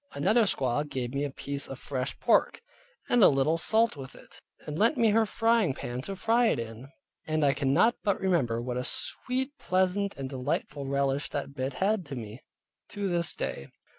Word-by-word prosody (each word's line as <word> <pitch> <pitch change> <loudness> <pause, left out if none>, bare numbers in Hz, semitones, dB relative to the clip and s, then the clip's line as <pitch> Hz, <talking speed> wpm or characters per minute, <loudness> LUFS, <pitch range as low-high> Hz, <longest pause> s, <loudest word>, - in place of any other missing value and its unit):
Another 230 0 +3
squaw 135 -6 +1
gave 125 -2 -4
me 140 +1 -1
a 145 - -1
piece 140 +1 -5
of 135 - -7
fresh 130 -1 -4
pork, - - +2 0.5
and 245 -3 +4
a - - +10
little 145 +4 +2
salt 225 +3 +2
with 135 -2 -9
it, - - -15 0.2
and 150 +1 -5
lent 230 +7 +3
me 230 -3 +4
her 220 +1 +3
pan 205 - 0
to 195 +8 -6
fry 230 +4 +2
it - - +2
in; 115 +2 -7 0.4
and 155 -1 +1
I 140 - +4
cannot 145 - +2
but 200 -2 +1
remember 145 -12 +1
what 125 0 -3
a 125 - -2
sweet, 260 - -2
pleasant 190 +2 0
and 135 -1 -4
delightful 135 +1 -3
relish 140 +1 0
that 140 -1 -4
bit 130 0 -3
had 195 +6 0
to 140 - -6
me, 110 0 -8 0.5
to 200 -1 -3
this 170 -2 0
day. 70 - -4
145 Hz, 190 wpm, -28 LUFS, 135-205 Hz, 0.5 s, a